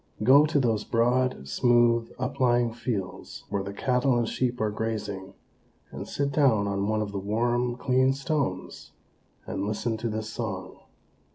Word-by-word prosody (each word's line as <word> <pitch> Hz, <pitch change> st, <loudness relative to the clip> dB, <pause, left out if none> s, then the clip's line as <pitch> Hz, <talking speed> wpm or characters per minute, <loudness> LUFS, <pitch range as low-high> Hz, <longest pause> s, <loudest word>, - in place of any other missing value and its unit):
Go 140 Hz, +6 st, +7 dB
to 150 Hz, -1 st, +1 dB
those 115 Hz, -5 st, +1 dB
broad, 120 Hz, -, +1 dB
smooth, 120 Hz, -, +3 dB
uplying 125 Hz, -3 st, +1 dB
fields, 115 Hz, -6 st, -5 dB
where 100 Hz, -1 st, -1 dB
the 100 Hz, 0 st, -5 dB
cattle 125 Hz, +4 st, +1 dB
and 120 Hz, -1 st, +1 dB
sheep 125 Hz, +1 st, -1 dB
are 110 Hz, -1 st, 0 dB
grazing, 105 Hz, -3 st, -4 dB, 0.6 s
and -, -, -7 dB
sit 140 Hz, 0 st, -1 dB
down 130 Hz, -8 st, +3 dB
on 100 Hz, 0 st, -1 dB
one 110 Hz, 0 st, +1 dB
of 100 Hz, -, -6 dB
the 100 Hz, -, -3 dB
warm, 120 Hz, +4 st, 0 dB
clean 130 Hz, +1 st, +2 dB
stones, 135 Hz, -, -3 dB, 0.5 s
and 95 Hz, -, -3 dB
listen 110 Hz, +2 st, -2 dB
to 115 Hz, +1 st, -3 dB
this 110 Hz, 0 st, -3 dB
song. 110 Hz, -6 st, -5 dB
115 Hz, 155 wpm, -27 LUFS, 105-125 Hz, 0.6 s, Go